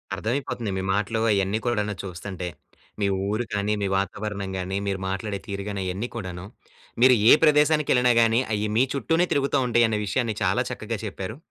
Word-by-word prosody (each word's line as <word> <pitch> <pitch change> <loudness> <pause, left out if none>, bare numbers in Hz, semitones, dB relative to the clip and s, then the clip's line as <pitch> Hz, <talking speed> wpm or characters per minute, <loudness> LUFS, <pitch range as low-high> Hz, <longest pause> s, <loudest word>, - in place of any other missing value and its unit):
అర్థమైపోతంది 115 0 -3
మీ 95 - -2
మాటలు 110 +2 -1
అయన్నీ 100 +2 +1
కూడాను 105 -3 0
చూస్తంటే. 90 0 -6 0.5
మీ 100 - +1 0.2
ఊరు 110 +4 -1
కానీ, 105 +1 0
మీ 100 - 0
వాతావరణం 100 0 -3
గానీ, 95 +1 -3
మీరు 95 -1 -1
మాట్లాడే 100 +1 -3
తీరుగాని 100 0 -4
అయ్యన్నీ 95 +6 -3
కూడాను, 90 -4 -6 0.6
మీరు 130 0 +7
ఏ - - +9
ప్రదేశానికెళ్ళినా 150 -5 +4
గానీ, 115 +1 +3
అయ్యి 105 0 -1
మీ 125 - +5
చుట్టూనే 165 +5 +1
తిరుగుతా 140 -1 +1
ఉంటయన్న 115 -2 +3
విషయాన్ని 115 +1 -1
చాలా - - +2
చక్కగా - - -4
చెప్పారు. 105 +6 -6
105 Hz, 155 wpm, -25 LUFS, 100-120 Hz, 0.6 s, ఏ